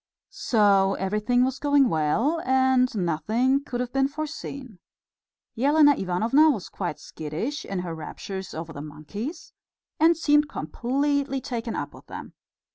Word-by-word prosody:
So 200 -4 +4
everything 210 +6 +1
was 260 +1 -3
going 285 -2 +4
well, 225 - +1
and 260 -1 +3
nothing 215 - +1
could 245 -3 -5
have 250 0 -4
been 270 0 +2
foreseen. 280 - -7 0.8
Elena 290 +4 +5
Ivanovna 225 - +3
was 215 -11 -2
quite 175 -5 -4
skittish 160 - -5
in 195 -2 -3
her 170 - -4
raptures 190 +4 -7
over 160 0 -6
the 145 - -7
monkeys, 155 - -7 0.5
and 325 +1 +5
seemed 295 -2 +3
completely 275 - -1
taken 235 -3 -4
up - - -4
with - - -15
them. - - -9
245 Hz, 135 wpm, -25 LUFS, 190-280 Hz, 0.8 s, Elena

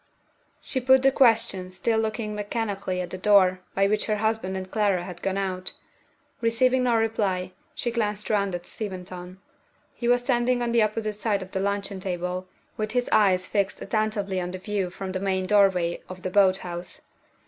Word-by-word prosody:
She 260 - -2
put 260 +1 +5
the 270 - +6
question, 225 -8 +3
still 220 +5 0
looking 220 -1 -2
mechanically 205 -3 -2
at 180 - -6
the 185 - -4
door 185 -2 +5 0.2
by 195 - +3
which 210 +1 0
her 215 - +1
husband 215 -3 -1
and 185 0 -7
Clara 200 -5 +1
had 175 -1 -8
gone 195 0 -1
out. 185 -1 -3 0.7
Receiving 250 +3 +3
no 245 -2 +2
reply, 205 -5 0 0.2
she 240 - -2
glanced 210 -3 -1
round 200 -3 +1
at 175 0 -6
Steventon. 185 -3 -6 0.6
He 235 - -4
was 245 0 +4
standing 245 -1 +1
on 235 - -1
the 235 -1 +4
opposite 215 0 0
side 205 -2 -1
of 190 - -13
the 190 - -2
luncheon 200 0 -2
table, 180 0 -3 0.3
with 215 0 -2
his 245 -1 0
eyes 185 -3 +4
fixed 200 -1 0
attentively 205 -3 -1
on 175 - -3
the 185 - -5
view 195 -1 -2
from 190 +1 -6
the 185 - -2
main 190 -1 0
doorway 185 -4 +3
of 185 0 -9
the 185 - -3
boat 190 -1 +5
house. 175 0 -6
200 Hz, 185 wpm, -25 LUFS, 185-220 Hz, 0.7 s, the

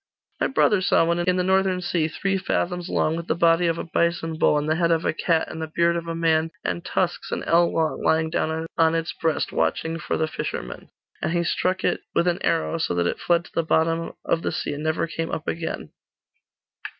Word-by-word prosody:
'My - - +2
brother 210 -7 +3
saw 185 -3 +3
one, 170 +1 +1
in 180 +1 +2
the 180 - +1
Northern 190 0 +2
sea, 175 -3 0
three 195 +5 -1
fathoms 180 -2 -1
long, 155 - +1
with 170 0 -5
the - - +1
body 170 0 +3
of 165 0 0
a - - -3
bison 170 -1 0
bull, 150 - +3
and 150 +1 -1
the 160 +1 +1
head 170 -1 +2
of 165 -1 +1
a - - +1
cat, 165 0 +1
and 160 - -7
the 160 - -3
beard 170 +2 +2
of 170 0 -4
a 165 - -3
man, 165 -1 +2
and 170 - -2
tusks 180 -1 -1
an - - -2
ell 170 +1 +3
long, 160 -1 0
lying 160 0 +2
down 160 -1 -1
on 165 0 +4
its 165 0 -2
breast, 160 -2 -1
watching 165 +1 -1
for - - -2
the 160 - 0
fishermen; 60 - -5 0.3
and 160 - -1
he 170 0 +1
struck 185 +2 0
it - - +1
with 170 - +2
an 175 -1 0
arrow, 165 0 0
so 160 - -1
that 85 0 +1
it - - -1
fled 170 0 +1
to - - -15
the - - +2
bottom 165 +1 0
of 165 - +1
the - - -2
sea, - - -3
and 145 +1 -5
never 160 +1 0
came 165 0 -4
up 155 - -4
again. 165 0 -4
165 Hz, 235 wpm, -24 LUFS, 160-175 Hz, 0.3 s, on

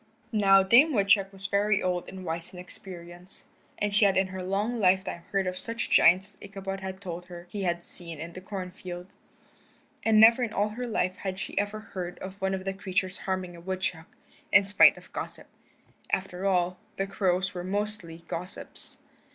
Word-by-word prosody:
Now 195 -3 +6
Dame 255 +11 +6
Woodchuck 200 -2 +3
was 195 0 -10
very 205 +1 +2
old 180 -1 -1
and 185 -1 -8
wise 165 +1 -4
in 180 - -9
experience, 180 0 -10 0.3
and 205 -1 -1
she 210 - +4
had 195 -2 +4
in 190 - +4
her 190 0 -5
long 205 +6 -1
lifetime 190 -3 +2
heard 195 -1 +1
of 185 0 -2
such 230 +1 -4
giants 190 +4 +5
as - - -24
Ichabod 195 -1 -6 0.2
told 180 -2 -6
her 175 -1 -10
he 205 - -4
had 175 -1 -1
seen 170 -3 -5
in 165 +2 -7
the 185 - -8
corn 185 -1 -5
field. 180 -1 -8 1.0
And 220 -1 +5
never 230 +3 +8
in 235 -3 -1
all 205 +1 +1
her 245 +3 -5
life 185 -5 0
had 190 -1 -4
she 195 - -6
ever 205 +1 -2
heard 180 -4 -6
of 190 +1 -9
one 190 0 +1
of 190 0 -6
the 195 - -1
creatures 190 -1 -2
harming 185 -2 -3
a 170 - -11
woodchuck, 185 -2 -3 0.4
in 195 - +6
spite 200 +1 +7
of - - -16
gossip. - - -6 0.7
After 190 0 -1
all, 180 -1 +1 0.2
the 195 - 0
crows 190 -1 0
were 180 -1 -5
mostly 190 -4 -3
gossips. 180 +3 -7
190 Hz, 190 wpm, -28 LUFS, 180-200 Hz, 1.0 s, never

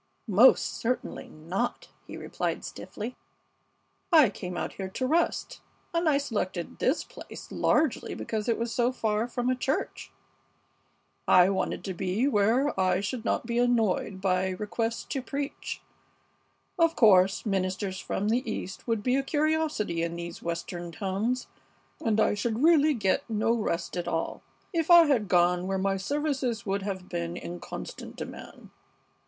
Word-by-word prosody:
"Most 225 +5 +6
certainly 250 +2 -2
not," 180 +10 -3 0.2
he - - -7
replied, - - -3
stiffly. 230 +4 -7 1.0
"I 305 - +7
came 180 -3 -6
out - - -3
here 190 -1 -5
to 255 +7 -2
rest, 325 +6 0 0.3
and 335 -1 +2
I 285 - +4
selected 205 - -3
this 270 - +1
place - - -11
largely 305 -4 +1
because 220 +1 -3
it 230 - +2
was 230 0 -2
so 245 0 +2
far 220 -2 0
from 245 0 -2
a 255 - +3
church. 265 +3 -2 1.2
I 180 0 +7
wanted 190 - -2
to 190 - -3
be 190 +8 0
where 240 +4 +2
I 185 -1 +3
should 220 +4 -3
not 235 - 0
be 235 0 0
annoyed 220 -5 +1
by 190 -1 +1
requests 220 +4 -2
to 270 - -3
preach. 280 +2 -5 1.0
Of 330 0 +4
course, 195 -3 +5
ministers 190 -1 -1
from 205 +2 -2
the 240 +3 +2
East 190 +1 -6
would 225 -3 0
be 255 +2 +2
a - - +2
curiosity 300 - 0
in 170 0 -2
these 170 0 -6
Western 170 +1 -4
towns, 205 +7 -1 0.6
and 220 -1 +2
I - - +4
should 220 +4 -1
really 310 -2 +5
get 205 -2 0
no 220 +1 +1
rest 185 -8 -2
at 175 - -3
all 165 - -2 0.3
if 330 -1 0
I 345 -1 +9
had 250 -9 +2
gone 180 0 +3
where 195 0 0
my 195 0 0
services 270 0 -1
would 200 0 -1
have 190 -2 -4
been 170 0 -3
in 175 0 -6
constant - - -8
demand. - - -9
215 Hz, 155 wpm, -28 LUFS, 185-255 Hz, 1.2 s, I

